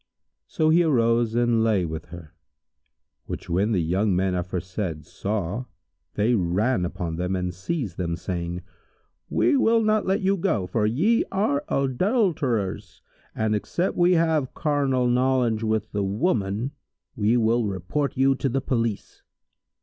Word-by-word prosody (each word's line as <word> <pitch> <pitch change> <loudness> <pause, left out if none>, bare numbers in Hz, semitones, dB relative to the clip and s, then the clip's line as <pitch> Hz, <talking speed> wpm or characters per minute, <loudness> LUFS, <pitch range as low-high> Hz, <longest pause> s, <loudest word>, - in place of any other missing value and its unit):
So 155 0 +1
he 165 +2 +5
arose 115 -7 +2
and 120 -1 +2
lay 105 -5 +2
with 80 -1 -5
her, 85 -2 -11 0.9
which 90 - -6
when 100 +6 +1
the 95 -6 +1
young 95 +4 +1
men 95 +1 +1
aforesaid 90 -2 -4
saw, 105 +5 -3 0.5
they 110 +4 +2
ran 100 +2 +1
upon 85 -2 -4
them 90 +2 -1
and 90 -1 -2
seized 100 - -4
them,[FN#149] 85 -2 -2
saying, 85 -1 -4 0.7
"We 300 - +2
will 230 -4 +3
not 215 -1 +1
let 190 +2 +1
you 195 +1 +2
go, 165 - 0
for 105 +3 0
ye 185 - +2
are 170 -8 0
adulterers, 140 - 0 0.3
and 110 -1 0
except 170 - -1
we 175 +1 +4
have 160 -5 +1
carnal 140 -5 +1
knowledge 125 -2 +2
of 110 -1 -1
the 100 -1 -1
woman, 105 - -1 0.4
we 110 +3 +2
will 115 0 +2
report 100 +10 -2
you 135 +1 +4
to 135 +1 -2
the 135 +2 0
police." 115 -6 -2
115 Hz, 145 wpm, -24 LUFS, 95-140 Hz, 0.9 s, he